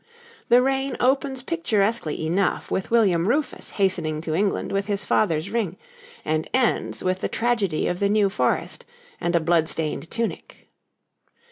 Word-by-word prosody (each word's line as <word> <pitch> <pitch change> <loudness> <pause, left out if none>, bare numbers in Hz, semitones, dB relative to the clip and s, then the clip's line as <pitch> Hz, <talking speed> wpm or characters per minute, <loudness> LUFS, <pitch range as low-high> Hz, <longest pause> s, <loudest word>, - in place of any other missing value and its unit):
The 245 +1 +6
reign 270 0 0
opens 265 0 +1
picturesquely 220 - 0
enough 180 +4 0
with 190 - -1
William 195 -7 +3
Rufus 275 +3 -1
hastening 175 -6 0
to 160 -1 -3
England 195 +4 0
with 195 0 -1
his 200 -1 -2
father's 160 -7 +1
ring, 205 -6 -1 0.5
and 155 0 -1
ends 255 -3 0
with 185 0 0
the - - -2
tragedy 220 -9 0
of 180 - -2
the 200 - +2
New 210 -1 +3
Forest - - -1 0.4
and 175 0 0
a - - +5
blood 165 0 +2
stained 160 +1 -3
tunic. 230 -1 -5
200 Hz, 150 wpm, -24 LUFS, 170-235 Hz, 0.5 s, The